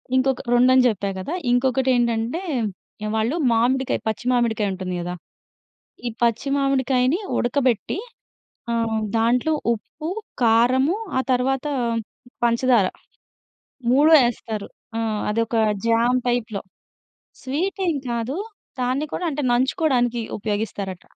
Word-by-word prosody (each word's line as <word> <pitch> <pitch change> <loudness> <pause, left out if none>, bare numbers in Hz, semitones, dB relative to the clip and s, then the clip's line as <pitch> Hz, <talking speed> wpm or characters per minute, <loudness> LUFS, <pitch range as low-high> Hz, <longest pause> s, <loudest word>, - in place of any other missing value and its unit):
ఇంకొక 260 0 +2
రెండని 255 +1 +5
జెప్పా 200 -3 -1
కదా! 290 - -4 0.2
ఇంకొకటేంటంటే, 245 +2 +1 0.6
ఆహ్, 215 - -2
వాళ్ళు 225 +8 0 0.2
మామిడికాయ 250 +3 +1
పచ్చి 220 +3 -4
మామిడికాయుంటుంది 205 -6 0
కదా! 180 +1 -4 0.9
ఈ - - 0
పచ్చి 235 +3 +1
మామిడికాయని 270 - +2 0.2
ఉడకబెట్టి 250 - 0 0.8
ఆహ్, 225 -1 0 0.2
దాంట్లో 245 +7 +2 0.2
ఉప్పు, 305 +8 -8 0.3
కారము 250 - +4 0.2
ఆ - - +4
తర్వాత 265 +3 0 0.8
పంచదార 235 -3 +3 1.0
3 295 +5 +5
యేస్తారు. 220 -3 -2 0.3
ఆ! - - 0 0.3
అదొక 230 +2 -1 0.3
జామ్ 235 +2 +3
టైప్‌లో. 225 -4 -1 0.8
స్వీటేం 350 +5 -1 0.2
కాదు. 235 +5 -2 0.4
దాన్ని 260 +5 0
కూడా 360 - -3
అంటే 295 0 -3
నంచుకోవడానికి 250 -2 +1 0.2
ఉపయోగిస్తారట. 205 -3 -3
245 Hz, 100 wpm, -22 LUFS, 225-265 Hz, 1.0 s, రెండని